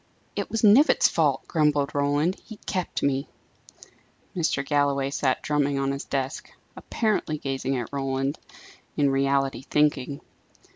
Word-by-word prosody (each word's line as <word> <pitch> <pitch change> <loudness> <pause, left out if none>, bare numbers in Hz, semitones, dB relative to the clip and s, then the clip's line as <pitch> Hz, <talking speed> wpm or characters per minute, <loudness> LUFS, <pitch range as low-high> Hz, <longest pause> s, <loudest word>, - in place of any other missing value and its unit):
"It - - -3
was 225 0 -2
Knivett's 230 +9 +6
fault," - - 0
grumbled 150 -3 +1
Roland. 145 +5 +1
"He 220 - -11
kept 185 -3 -3
me." 140 0 0 1.1
Mr. 155 -5 0
Galloway 140 -1 +1
sat 135 -2 0
drumming 145 -1 +1
on 135 0 0
his 140 0 -5
desk, 135 -1 -3 0.3
apparently 210 -9 -1
gazing 135 -1 -2
at 120 +2 -5
Roland; 135 +1 -2 0.6
in 140 -2 +3
reality 135 -1 +1
thinking. 145 -1 0
140 Hz, 130 wpm, -25 LUFS, 135-150 Hz, 1.1 s, Knivett's